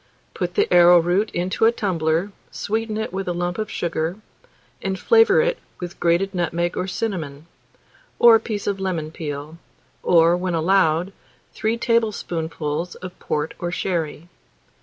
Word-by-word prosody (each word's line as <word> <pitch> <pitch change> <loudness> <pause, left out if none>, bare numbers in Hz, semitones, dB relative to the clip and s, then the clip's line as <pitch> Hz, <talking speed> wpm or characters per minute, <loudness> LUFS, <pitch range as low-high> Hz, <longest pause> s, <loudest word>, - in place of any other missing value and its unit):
Put - - -3
the 420 +1 +3
arrowroot 175 +4 +5
into 185 +5 0
a 225 - +6
tumbler, 175 -3 -1 0.2
sweeten 220 0 -3
it 220 -4 -4
with 195 0 -3
lump 175 +4 -2
sugar, 165 -1 -2 0.6
and 190 0 -2
flavour 455 - +5
it - - 0 0.2
with 175 -1 -7
grated 175 +3 +1
nutmeg 175 -1 -1
or 185 - -2
cinnamon, 165 -9 -4 0.7
or 235 -1 +8
a 225 - +6
piece 210 -3 -5
of 200 -1 -1
lemon 170 -5 -3
peel, 150 0 -6 0.4
or, 170 0 +4
when 180 -1 -2
allowed, 170 +1 +2 0.4
3 220 +2 -1
tablespoonfuls 175 -8 -1
of 185 0 -10
port 150 +1 -2
or 175 - -2
sherry. 170 -3 -3
180 Hz, 140 wpm, -22 LUFS, 165-205 Hz, 0.7 s, or